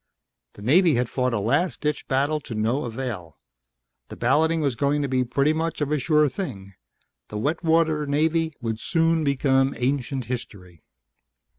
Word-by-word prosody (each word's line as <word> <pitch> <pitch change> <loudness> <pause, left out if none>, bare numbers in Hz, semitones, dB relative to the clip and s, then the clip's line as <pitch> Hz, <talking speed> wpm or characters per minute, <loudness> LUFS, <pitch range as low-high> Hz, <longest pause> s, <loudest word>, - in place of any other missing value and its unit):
The 100 - -12
Navy 165 - +4
had 120 0 -1
fought 125 -1 0
a 115 - 0
last 145 - 0
ditch 150 -1 -2
battle 140 +3 +1
to 125 -5 -8
no 115 +7 0
avail. 115 - -6 0.7
The - - -8
balloting 160 +7 +2
was 140 -4 0
going 145 +4 0
to - - -1
be 130 -1 +1
pretty 140 +5 +1
much 165 0 -2
of 145 -1 -1
a 150 - +1
sure 150 +2 +3
thing 115 - -6 0.5
the 105 - -6
wet 150 +11 -1
water 160 -2 +2
Navy 160 +3 +1
would 110 -2 -3
soon 165 +1 +1
become 135 -1 +2
ancient 130 0 -1
history. 105 -9 -7
140 Hz, 165 wpm, -24 LUFS, 120-155 Hz, 0.7 s, Navy